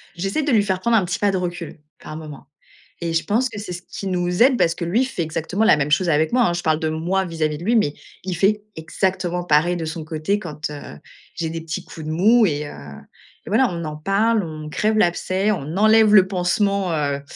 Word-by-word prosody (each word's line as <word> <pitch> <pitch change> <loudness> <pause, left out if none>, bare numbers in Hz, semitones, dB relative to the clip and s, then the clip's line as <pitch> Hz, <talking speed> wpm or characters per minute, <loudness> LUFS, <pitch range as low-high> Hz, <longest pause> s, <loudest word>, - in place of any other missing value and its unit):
j'essaie 195 - -2
de 290 - 0
lui 215 -3 +4
faire 190 -2 -1
prendre 235 -1 +3
un 195 - +2
petit 175 - -2
pas 205 -1 +2
de 190 - -1
recul, 175 -3 -5 0.2
par 155 - -9
moment 150 -3 -10 0.5
et 170 -1 -2
je 165 -1 +1
pense 230 +8 +1
que 205 - -9
c'est 205 -3 -7
ce 175 - -7
qui 195 - -7
nous 180 +3 +1
aide 260 -1 +4
parce 165 0 +2
que - - -5
lui 220 +10 +2
fait 255 -9 -4
exactement 165 +6 -2
la 185 - +6
même 150 0 -1
chose 175 +3 +2
avec 155 +3 +1
moi, 245 -1 +4
hein. 175 - 0
Je 175 - -3
parle 155 0 +1
de 160 - 0
moi 175 +5 -1
vis-à-vis 155 -3 -2
de 170 - -9
lui, 235 - +2
mais 150 -9 +1 0.3
il 185 -2 -2
fait 205 +4 +1
exactement 180 +2 -2
pareil 170 +3 +3
de 165 - -4
son 160 0 -5
côté 160 +5 -1
quand, 150 -6 -6
heu, 145 - -9 0.4
j'ai 165 - -3
des 165 0 -5
petits 160 -1 -5
coups 160 - -10
de - - -2
mou 215 +8 +4
et 150 -3 -1
heu, - - -8 0.8
et - - -5
voilà, 235 +5 +3
on 170 -1 -4
en 150 -1 -5
parle, 200 +6 +1
on 155 -2 -7
crève 215 +7 0
l'abcès, 185 +1 +1
on 160 -2 -4
enlève 215 0 +5
le 190 -2 +7
pansement, 190 +1 0
heu, 140 -2 -1
175 Hz, 240 wpm, -21 LUFS, 160-205 Hz, 0.8 s, le